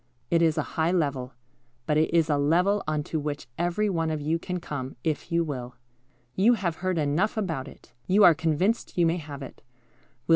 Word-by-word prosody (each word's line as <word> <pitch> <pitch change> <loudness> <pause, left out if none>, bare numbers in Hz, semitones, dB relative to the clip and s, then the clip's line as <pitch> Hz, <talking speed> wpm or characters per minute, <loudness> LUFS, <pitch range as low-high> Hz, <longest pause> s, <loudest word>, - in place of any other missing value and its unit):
It 170 -1 +4
is 160 -2 +3
a - - +1 0.2
high 165 +2 +3
level, 140 -7 -1 0.5
but 150 - +1
it 155 +1 +2
is 165 -1 +3
a 150 - +2
level 180 +8 +3
on 155 -1 0
to 155 - -3
which 145 0 -4
every 175 +7 0
one 165 -5 0
of 155 -1 -2
you 155 +3 -1
can 180 +1 -4
come, 135 -5 -6
if 160 +2 -2
you 170 0 +2
will. 125 -5 -5 0.6
You 225 +6 +4
have 175 -6 -2
heard 185 0 -1
enough 155 +9 +1
about 160 -10 -2
it. 120 - -15
You 200 +3 +5
are 175 - +9
convinced 165 +9 0
you 175 - +4
may 165 +1 +2
have 145 -4 -7
it. 135 - -11
160 Hz, 205 wpm, -26 LUFS, 150-180 Hz, 0.6 s, are